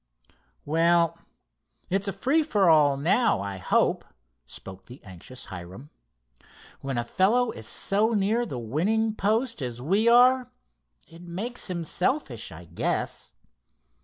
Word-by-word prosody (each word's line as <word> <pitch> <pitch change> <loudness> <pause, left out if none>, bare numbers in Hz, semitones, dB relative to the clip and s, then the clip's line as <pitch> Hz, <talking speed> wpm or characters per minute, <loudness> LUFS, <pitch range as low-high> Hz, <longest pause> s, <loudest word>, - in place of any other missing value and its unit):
"Well, 170 +2 +2 0.7
it's 195 +2 +1
a - - 0
free 265 - +1
for 210 - +1
all 145 -3 +4
now, 180 - +2
I 100 0 -5
hope," 90 - +1 0.4
spoke 95 +9 -10
the 125 +2 -12
anxious 95 +6 -11
Hiram. 95 - -10 0.9
"When 135 -2 -4
a 120 - 0
fellow 215 - +2
is 110 -1 -9
so 215 +4 0
near 215 +4 +1
the 175 - -5
winning 190 - 0
post 220 - 0
as 120 -2 -4
we 195 - +1
are, 250 +1 +5 0.6
it 165 +1 -15
makes 195 +8 -5
him 170 -2 -3
selfish, 165 - -2
I 85 +2 -11
guess. - - -3
175 Hz, 135 wpm, -26 LUFS, -, 0.9 s, are